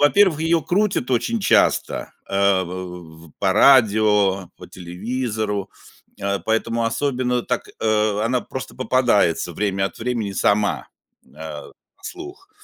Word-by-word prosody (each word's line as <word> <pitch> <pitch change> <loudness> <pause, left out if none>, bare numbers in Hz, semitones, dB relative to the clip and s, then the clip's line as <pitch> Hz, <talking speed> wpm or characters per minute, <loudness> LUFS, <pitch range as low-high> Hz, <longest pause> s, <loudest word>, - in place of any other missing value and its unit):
во-первых, 160 +2 +4
ее 165 -1 +2
крутят 190 -8 0
очень 230 - 0
часто, - - +1 0.2
э, 100 -1 +2
в 90 -3 -9
по 95 -2 +1
радио, 105 -6 +4
по - - -12
телевизору, 105 +2 -4 0.5
э, 100 0 -1
поэтому 115 +1 0
особенно 125 0 -1
так, - - -3
э, 105 -1 +1
она 125 +1 +1
просто 130 0 -7
попадается 120 -10 +1
время 95 +1 -1
от 95 - -10
времени 115 -4 -2
сама, 105 +1 +1 0.4
э, - - -27
на 75 -1 -9 0.3
слух. 365 +2 -9
110 Hz, 125 wpm, -21 LUFS, 95-130 Hz, 0.5 s, во-первых